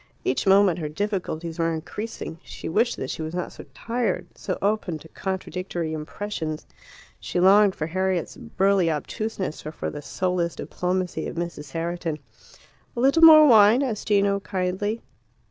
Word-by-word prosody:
Each 130 Hz, +8 st, 0 dB
moment 195 Hz, -3 st, +5 dB
her 155 Hz, -2 st, -3 dB
difficulties 170 Hz, -2 st, -3 dB
were 165 Hz, 0 st, +1 dB
increasing. 165 Hz, +1 st, -6 dB
She -, -, -8 dB
wished 230 Hz, +8 st, +1 dB
that 130 Hz, -, -4 dB
she -, -, -5 dB
was 160 Hz, +2 st, -5 dB
not 180 Hz, -, -4 dB
so -, -, -11 dB
tired, 230 Hz, -6 st, -2 dB
so -, -, -4 dB
open 200 Hz, -5 st, 0 dB
to 160 Hz, -, -14 dB
contradictory 185 Hz, -3 st, -4 dB
impressions. 155 Hz, 0 st, -5 dB, 0.5 s
She -, -, -3 dB
longed 195 Hz, +2 st, +6 dB
for 155 Hz, -, -3 dB
Harriet's 185 Hz, +1 st, -1 dB
burly 190 Hz, -2 st, +1 dB
obtuseness 190 Hz, +3 st, -3 dB
or 155 Hz, -, -5 dB
for -, -, -5 dB
the 145 Hz, -, -7 dB
soulless 180 Hz, +1 st, -1 dB
diplomacy 180 Hz, -2 st, -2 dB
of -, -, -6 dB
Mrs. 165 Hz, -4 st, -5 dB
Herriton. 165 Hz, -1 st, -3 dB, 0.8 s
"A -, -, -1 dB
little 275 Hz, +6 st, +4 dB
more 310 Hz, -1 st, +10 dB
wine?" 225 Hz, 0 st, +6 dB
asked 230 Hz, -6 st, -3 dB
Gino 200 Hz, -1 st, +3 dB
kindly. 195 Hz, +3 st, -2 dB
185 Hz, 155 wpm, -24 LUFS, 165-205 Hz, 0.8 s, more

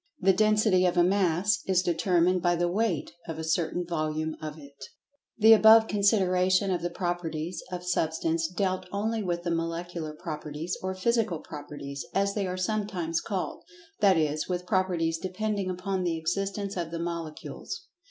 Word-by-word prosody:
The 190 Hz, +1 st, +4 dB
"Density" 210 Hz, -2 st, +3 dB
of 175 Hz, -, -1 dB
a 175 Hz, -, +6 dB
"Mass" 190 Hz, +2 st, +2 dB
is 185 Hz, -1 st, +3 dB
determined 175 Hz, +1 st, +2 dB
by 175 Hz, +1 st, +2 dB
the 175 Hz, +1 st, +1 dB
weight 215 Hz, +6 st, 0 dB, 0.2 s
of 165 Hz, -1 st, -5 dB
a 160 Hz, -, -4 dB
certain 165 Hz, +2 st, 0 dB
"Volume" 155 Hz, -1 st, -2 dB
of 155 Hz, 0 st, -6 dB
it. 140 Hz, -2 st, -13 dB, 0.5 s
The 225 Hz, 0 st, +8 dB
above 220 Hz, +1 st, +7 dB
consideration 190 Hz, -2 st, +2 dB
of 175 Hz, -3 st, 0 dB
the 175 Hz, -, -1 dB
"Properties" 175 Hz, -1 st, -3 dB
of 180 Hz, -1 st, -4 dB
Substance 165 Hz, -1 st, 0 dB
dealt 185 Hz, +1 st, -2 dB
only 220 Hz, +2 st, -1 dB
with 175 Hz, -3 st, -2 dB
the 175 Hz, -, -1 dB
Molecular 165 Hz, -1 st, -3 dB
Properties, 155 Hz, +1 st, -5 dB
or 185 Hz, 0 st, -3 dB
Physical 220 Hz, -2 st, +1 dB
Properties, 145 Hz, -2 st, -7 dB
as 200 Hz, 0 st, +2 dB
they 200 Hz, -2 st, -1 dB
are 180 Hz, 0 st, -3 dB
sometimes 185 Hz, -4 st, -1 dB
called—that 215 Hz, -, -1 dB
is, 155 Hz, 0 st, 0 dB
with 180 Hz, 0 st, -2 dB
properties 175 Hz, -3 st, 0 dB
depending 200 Hz, +1 st, -2 dB
upon 185 Hz, +1 st, -2 dB
the 170 Hz, -2 st, 0 dB
existence 195 Hz, +4 st, -2 dB
of 170 Hz, -3 st, -3 dB
the 165 Hz, -, -4 dB
Molecules. 170 Hz, -, -5 dB
180 Hz, 160 wpm, -28 LUFS, 165-195 Hz, 0.5 s, The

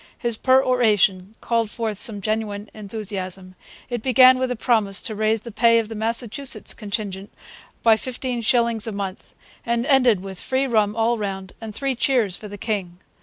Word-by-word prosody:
His 235 Hz, -2 st, 0 dB
peroration 220 Hz, -7 st, +2 dB
called 230 Hz, -2 st, 0 dB
forth 220 Hz, -3 st, -4 dB
some 210 Hz, -4 st, 0 dB
genuine 210 Hz, 0 st, -3 dB
enthusiasm. 195 Hz, -3 st, -5 dB, 0.3 s
It 240 Hz, -2 st, -4 dB
began 255 Hz, +1 st, +6 dB
with 260 Hz, 0 st, 0 dB
a 250 Hz, -, -1 dB
promise 215 Hz, -4 st, +1 dB
to 220 Hz, -, -4 dB
raise 215 Hz, +1 st, 0 dB
the 235 Hz, -, -9 dB
pay 230 Hz, +2 st, +4 dB
of 225 Hz, -1 st, 0 dB
the -, -, -5 dB
Massachusetts 230 Hz, +2 st, -2 dB
contingent 200 Hz, -2 st, -5 dB, 0.5 s
by 225 Hz, -1 st, +6 dB
fifteen 250 Hz, 0 st, -4 dB
shillings 235 Hz, -1 st, +1 dB
a -, -, -2 dB
month, 200 Hz, -2 st, -6 dB, 0.3 s
and 235 Hz, +1 st, -1 dB
ended 250 Hz, -9 st, +4 dB
with 190 Hz, -2 st, -7 dB
free 265 Hz, +1 st, 0 dB
rum 215 Hz, -4 st, +1 dB
all 230 Hz, +1 st, +1 dB
round 195 Hz, -2 st, -5 dB
and 220 Hz, -2 st, -7 dB
three 275 Hz, -1 st, -1 dB
cheers 235 Hz, -6 st, +1 dB
for 210 Hz, -, -9 dB
the 205 Hz, 0 st, -9 dB
king. 195 Hz, -5 st, -3 dB
220 Hz, 170 wpm, -22 LUFS, 205-240 Hz, 0.5 s, began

